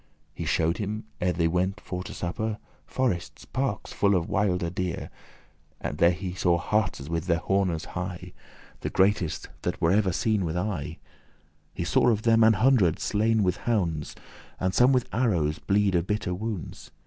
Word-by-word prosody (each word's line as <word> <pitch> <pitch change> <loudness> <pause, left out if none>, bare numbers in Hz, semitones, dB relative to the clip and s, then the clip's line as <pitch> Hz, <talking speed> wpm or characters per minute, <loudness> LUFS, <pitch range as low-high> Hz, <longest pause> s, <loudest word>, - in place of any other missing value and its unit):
He - - -5
shewed 85 +1 +1
him, 105 +1 -3 0.2
ere 90 0 +2
they 85 -1 +1
went 90 +4 0
to - - -17 0.3
suppere, 105 +5 -3 0.3
Forestes, 85 - -2
parkes, 130 -6 -3
full 100 -1 +3
of 85 -2 0
wilde 90 -3 0
deer. 90 -2 -3 0.7
There 85 +1 +2 0.2
saw 85 -2 +2
he 80 - -8
hartes 100 -10 0
with 85 +1 -2
their 85 -2 +3
hornes 95 -2 0
high, 90 0 -6 0.5
The - - -3
greatest 95 -4 +1
that - - -2
were 80 - +3
ever 100 -1 +3
seen 105 +3 +1
with 80 0 -2
eye. 90 -5 -3 0.8
He - - -2
saw - - +3
of 110 -2 +1
them 115 -1 +5
an 110 0 +7
hundred 110 - +3
slain 110 +1 +1
with 90 -1 +1
hounds, 85 -10 -1 0.4
And 95 0 0
some 125 +5 +5
with 125 -2 +2
arrows 85 -11 +1
bleed 100 -1 +2
of 85 0 +1
bitter 105 -3 -1
wounds. 105 -1 -5
95 Hz, 165 wpm, -27 LUFS, 85-105 Hz, 0.8 s, an